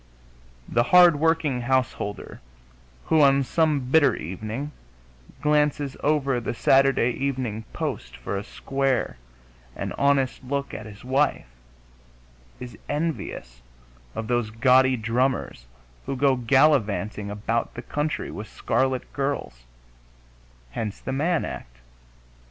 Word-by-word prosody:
The 120 - +2
hard 175 -3 +7
working 160 -5 +1
householder 120 -5 -2 0.6
who, 160 -1 +3
on 140 -1 +5
some 155 +2 +2
bitter 160 -2 +5
evening, 110 - -5 0.7
glances 150 -2 +1
over 140 -4 +1
the 120 - -4
Saturday 135 -1 +4
Evening 125 -5 -3
Post - - -4
for - - -4
a 100 - -3
square 135 - -1 0.6
and - - -4
honest 140 -2 +2
look 140 +2 -3
at 110 - -7
his 105 +2 -12
wife 135 +2 +1 1.1
is 125 -1 -9
envious 145 - -3 0.5
of 110 - -3
those 120 -2 0
gaudy 130 +3 +4
drummers 115 - -1 0.4
who 135 - -2
go 135 0 +3
gallivanting 115 -5 +2
about 110 +3 -2
the 120 - -6
country 150 +1 -2
with 105 +1 -7
scarlet 130 -1 -1
girls; 135 - -3 1.1
hence 105 - -4
the - - -5
Mann 160 +5 +1
act. - - -8
130 Hz, 115 wpm, -25 LUFS, 110-145 Hz, 1.1 s, hard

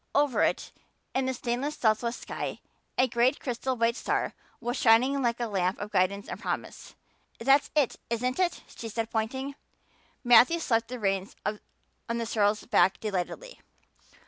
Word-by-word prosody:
Over 285 -3 +3
it, - - 0 0.4
in 265 0 0
the 260 - 0
stainless 250 +6 -2
southwest 230 +1 +1
sky, - - -5 0.4
a 255 - +4
great 240 +3 +2
crystal 255 +1 -2
white 230 0 +2
star - - -1 0.3
was 240 +1 -2
shining 255 +3 +4
like 235 -1 0
a 240 - 0
lamp 190 -3 0
of 205 +1 -6
guidance 200 +2 +1
and - - -6
promise. - - -5 0.4
"That's 275 +4 +3
it, 290 -5 +2
isn't 250 +4 -1
it?" 360 -2 0
she 230 - -6
said, 225 +1 -3
pointing. 265 +5 -2 0.7
Matthew 245 +6 +7
slapped 230 -8 0
the 250 - -5
reins 195 -3 -1
on 210 0 -2 0.6
the 230 - -2
sorrel's 210 -1 +1
back 190 -4 +3
delightedly. 215 - -4
235 Hz, 155 wpm, -28 LUFS, 220-260 Hz, 0.7 s, Matthew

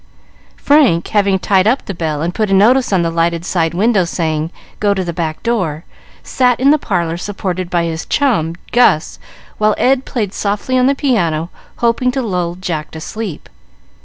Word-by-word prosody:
Frank, 275 - +3
having 200 -2 +2
tied 190 +1 +2
up 250 +5 +1
the 200 - -4
bell 155 -3 -3
and 175 +1 -2
put 215 0 -1
a 195 - +3
notice 245 +6 +4
in 185 -3 +2
the 165 - -1
lighted 170 0 0
side 170 -3 0
window, 205 0 +3
saying, 160 -2 -2 0.3
"Go 205 -1 +2
to 190 - -1
the 170 -1 -4
back 160 -2 -4
door," 180 -10 -1 0.4
sat 250 -2 +1
in 270 +2 +4
the 305 - +3
parlor, 170 -8 -1
supported 185 -2 -4
by 175 -1 +1
his 165 0 -4
chum, 210 - +1 0.2
Gus, 240 -10 +2 0.4
while 215 0 +3
Ed 265 0 +2
played 215 -8 -3
softly 210 +5 -2
on 255 0 +3
the 280 - +2
piano, 175 - 0 0.3
hoping 245 +2 +2
to 265 - -1
lull 180 -5 -2
Jack 170 -4 -4
to - - -6
sleep. 200 0 -6
190 Hz, 185 wpm, -16 LUFS, 170-230 Hz, 0.4 s, notice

